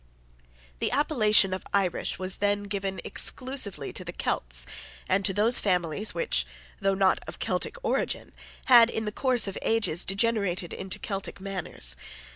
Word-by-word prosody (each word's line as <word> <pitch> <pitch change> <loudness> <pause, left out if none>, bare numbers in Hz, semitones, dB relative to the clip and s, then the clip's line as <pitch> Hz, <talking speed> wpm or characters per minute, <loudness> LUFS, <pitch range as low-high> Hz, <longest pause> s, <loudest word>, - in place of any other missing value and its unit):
The - - 0
appellation 215 -9 +3
of 185 - -4
Irish 195 -3 0
was 185 +1 -2
then 205 0 +1
given 195 -1 -3
exclusively 260 -6 0
to - - -6
the - - -6
Celts - - -2 0.4
and 195 +1 +1
to - - +4
those 215 +5 +4
families 180 +1 +1
which, 165 - +1 0.4
though 195 0 +1
not 190 -1 +3
of - - -7
Celtic - - -1
origin, 470 - -2 0.3
had 240 -3 +7
in 220 -1 -3
the 210 - -2
course 250 -2 +1
of 195 - -5
ages 215 -7 +2
degenerated 195 -4 0
into 190 -1 -3
Celtic 195 -1 -5
manners. 185 - -2
200 Hz, 150 wpm, -27 LUFS, 185-220 Hz, 0.4 s, had